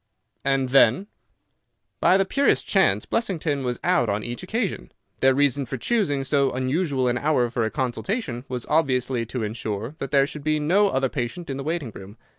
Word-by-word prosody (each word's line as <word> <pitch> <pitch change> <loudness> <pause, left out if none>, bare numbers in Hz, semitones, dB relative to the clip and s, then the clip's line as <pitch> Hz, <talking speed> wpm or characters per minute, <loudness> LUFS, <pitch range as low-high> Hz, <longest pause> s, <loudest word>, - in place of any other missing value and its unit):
"And 135 -1 +1
then?" 135 - +4 0.9
"By 185 - +5
the 195 - +2
purest 275 +8 +2
chance - - +2
Blessington 160 - -1
was 125 -1 -2
out 175 -11 +2
on 100 +1 -1
each 120 0 -5
occasion. 190 - -3 0.3
Their 130 0 +4
reason 140 -1 +1
for 135 - -4
choosing 145 - 0
so 140 0 +2
unusual 130 +1 0
an 120 +1 0
hour 130 -6 +1
for 115 - -1
a - - -1
consultation 130 - -3
was 125 -2 -4
obviously 130 -6 0
to 120 0 -3
insure 110 +2 -4
that 135 - -4
there 140 -1 +4
should 145 +1 -8
be 155 0 +1
no 185 +8 +3
other 135 -8 +1
patient 135 +5 -4
in 135 - -4
the 135 - -5
waiting 155 -5 -3
room. 100 +2 -12
135 Hz, 185 wpm, -24 LUFS, 120-155 Hz, 0.9 s, By